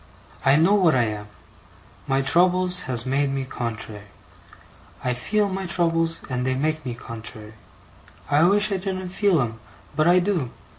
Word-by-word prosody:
I 135 +1 +5
know 165 +6 +4
what 180 -8 +4
I 125 - +3
am. 105 -2 -4 0.8
My 135 0 +1
troubles 180 +4 +3
has 120 -2 +1
made 135 +2 +1
me 135 -1 -2
contrary. 110 -4 -6 1.0
I 125 - 0
feel 205 - 0
my 190 -1 -4
troubles, 165 -1 +1
and 125 -2 -2
they 130 0 0
make 155 +3 -1
me 125 -2 -5
contrary. 110 -2 -8 0.7
I 145 +1 +3
wish 205 +3 +3
I 195 - +1
didn't 185 -1 -4
feel 190 -2 +2
'em, 115 -3 -2 0.4
but 155 +1 +2
I 175 +1 +6
do. 180 -8 0
155 Hz, 160 wpm, -23 LUFS, 125-180 Hz, 1.0 s, I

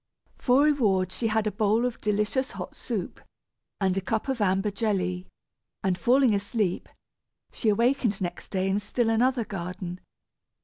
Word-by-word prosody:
For 255 +2 +4
reward, 205 -12 +2
she 225 +4 -1
had 220 0 +1
a 215 - 0
bowl 215 +3 +2
of 250 -2 -3
delicious 210 +6 0
hot - - -7
soup, - - -5 0.6
and 190 -2 +1
a 195 - 0
cup 220 +6 -2
of 260 -4 -1
amber 195 +1 +2
jelly, 185 -4 -1 0.6
and 190 -2 +2
falling 250 +3 +4
asleep, 200 -2 -1 0.6
she 225 - 0
awakened 235 -1 +2
next 175 -2 -5
day 190 -1 0
in 195 +1 +1
still 225 +3 0
another 240 +1 +2
garden. 180 -1 -5
210 Hz, 150 wpm, -27 LUFS, 190-235 Hz, 0.6 s, For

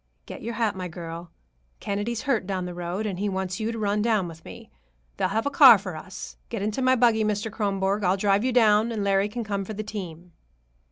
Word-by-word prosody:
"Get - - -9
your 235 0 -5
hat, 225 -4 0
my 185 -1 -4
girl. 170 0 -8 0.5
Kennedy's 205 +3 -3
hurt 235 -9 0
down 190 -2 -2
the 180 - -6
road, 175 +4 -4
and 190 -4 -3
he 205 +1 0
wants 190 -1 -3
you 220 +1 -1
to 230 - -5
run 210 -1 0
down 215 -5 +1
with 160 -1 -11
me. 90 - -12 0.5
They'll - - +1
have 220 +4 -1
a 285 - 0
car 265 -5 +9
for 185 -4 -7
us. 185 +4 -9
Get 225 -4 -4
into 215 +5 -2
my 255 0 +4
buggy, 230 -3 +3
Mr. 210 +1 -1
Kronborg. 200 -1 -1
I'll 185 +1 +2
drive 200 +1 +2
you 255 - +1
down, 220 -2 +4
and 215 -3 -2
Larry 195 +1 +2
can 235 +2 -4
come 200 -2 -2
for 215 +2 -7
the 215 - -4
team." 180 -5 -7
205 Hz, 230 wpm, -25 LUFS, 185-220 Hz, 0.5 s, car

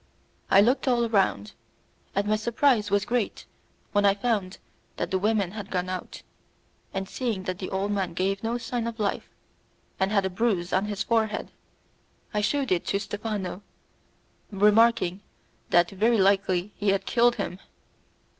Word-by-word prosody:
I 195 - +7
looked 250 +6 +2
all 240 -2 +3
round, 195 - +1 0.6
and 200 +1 +1
my 210 +1 +2
surprise 230 0 +2
was 200 0 +1
great 240 -3 -2 0.5
when 205 -1 +2
I 200 -1 +5
found 200 -4 -1 0.4
that - - -3
the 190 - +1
women 205 -2 +1
had 205 -1 -7
gone 180 -1 -2
out, 185 0 -6 0.7
and 195 0 -3
seeing 225 -6 -3
that 185 -1 -4
the 185 - -4
old 195 +2 -1
man 190 -4 -2
gave 195 +2 0
no 230 +1 -1
sign 240 -1 -3
of 230 -1 -6
life, 205 -2 -2 0.7
and 190 +1 +1
had 200 -2 +2
a - - 0
bruise 190 -3 0
on 190 +2 +2
his 205 -1 -2
forehead, 220 -2 0 0.8
I 210 - +1
shewed 270 +4 0
it 180 -2 +1
to 200 - +1
Stephano, 205 -2 -4 0.9
remarking 205 -2 +3 0.5
that 175 0 +4
very 220 +4 +2
likely 195 -1 +2
he 205 - 0
had 195 0 +1
killed 240 0 +3
him. 195 -3 -4
205 Hz, 160 wpm, -26 LUFS, 190-225 Hz, 0.9 s, I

